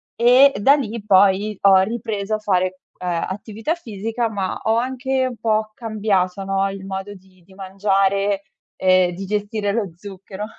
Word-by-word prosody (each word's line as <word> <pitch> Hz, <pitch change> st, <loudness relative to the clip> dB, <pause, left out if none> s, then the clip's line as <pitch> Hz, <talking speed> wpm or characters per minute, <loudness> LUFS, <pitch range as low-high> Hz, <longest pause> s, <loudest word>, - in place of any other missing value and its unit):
e 255 Hz, +4 st, +6 dB
da 275 Hz, +8 st, +5 dB
lì 235 Hz, -6 st, -4 dB
poi 200 Hz, +1 st, +3 dB
ho 195 Hz, -1 st, +6 dB
ripreso 215 Hz, 0 st, -2 dB
a -, -, -4 dB
fare, 185 Hz, -3 st, 0 dB, 0.2 s
ehm, 175 Hz, -2 st, -2 dB
attività 215 Hz, -, -4 dB
fisica, 225 Hz, -, -3 dB
ma 195 Hz, -3 st, -3 dB
ho 220 Hz, +1 st, +2 dB
anche 260 Hz, +1 st, -1 dB
un 250 Hz, -, -6 dB
po' 215 Hz, -1 st, 0 dB
cambiato 200 Hz, -5 st, -1 dB
no, 195 Hz, 0 st, 0 dB
il 195 Hz, 0 st, -8 dB
modo 195 Hz, +1 st, -5 dB
di 185 Hz, -2 st, -20 dB
di 190 Hz, -, -19 dB
mangiare 195 Hz, +1 st, 0 dB, 0.3 s
e 185 Hz, -1 st, +3 dB
di 195 Hz, +3 st, -6 dB
gestire 205 Hz, 0 st, -2 dB
lo 205 Hz, -5 st, -2 dB
zucchero. 195 Hz, +1 st, -8 dB
200 Hz, 160 wpm, -21 LUFS, 190-220 Hz, 0.3 s, e